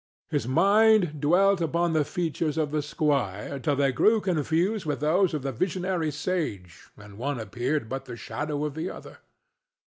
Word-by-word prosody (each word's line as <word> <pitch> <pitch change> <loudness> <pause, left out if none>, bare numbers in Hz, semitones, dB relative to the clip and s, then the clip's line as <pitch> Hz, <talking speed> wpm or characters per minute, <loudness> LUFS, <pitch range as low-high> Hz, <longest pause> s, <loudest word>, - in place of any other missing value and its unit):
His 115 - -1
mind 195 - +4
dwelt 185 +5 +3
upon 170 +1 0
the 155 -1 +3
features 160 -1 -2
of 155 -2 0
the 155 0 0
squire 140 -6 -1
till 145 +2 0
they 140 -1 +2
grew 215 - +3
confused 180 +3 0
with 150 -2 -2
those 170 +5 +2
of 145 - -4
the 135 - -2
visionary 180 - -1
sage 145 - -4
and 105 0 -13
one 140 0 -2
appeared 120 +5 -2
but 135 +3 -5
the 120 -2 -8
shadow 150 +3 -3
of 150 - -3
the 160 +4 -4
other. - - -11
150 Hz, 170 wpm, -26 LUFS, 135-175 Hz, -, mind